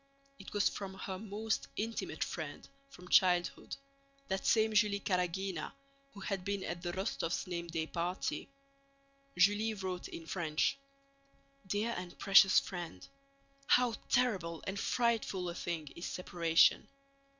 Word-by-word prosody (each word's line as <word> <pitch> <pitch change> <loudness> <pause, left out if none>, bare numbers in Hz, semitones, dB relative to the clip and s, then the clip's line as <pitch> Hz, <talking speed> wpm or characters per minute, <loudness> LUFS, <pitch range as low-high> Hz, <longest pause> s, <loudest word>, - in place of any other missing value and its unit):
It 195 - -10
was 205 -1 +3
from 195 -1 -4
her 190 0 -5
most 215 +1 -2
intimate 225 +2 -2
friend - - -6 0.2
from 180 -10 -13
childhood; 180 -1 +3 0.5
that 190 0 -1
same 220 -1 +4
Julie 210 -1 +3
Karágina 180 -2 -1 0.4
who 200 - -9
had 195 -2 -2
been 200 0 -2
at 175 -1 -4
the 175 -1 -2
Rostóvs' 185 -2 -2
name 170 -2 -4
day 165 -1 -2
party. 175 +8 -3 0.9
Julie 205 +4 +4
wrote 185 -2 -4
in 165 - -8
French: 160 -3 0 0.9
Dear 210 +4 0
and 175 -1 -7
precious 195 -1 +7
Friend, 175 - -7 0.6
How 245 -2 +4 0.2
terrible 190 -10 +1
and 195 +1 -3
frightful 225 -7 0
a - - -4
thing 165 -4 -4
is 170 - -5
separation! 170 -2 +3
190 Hz, 130 wpm, -34 LUFS, 175-205 Hz, 0.9 s, precious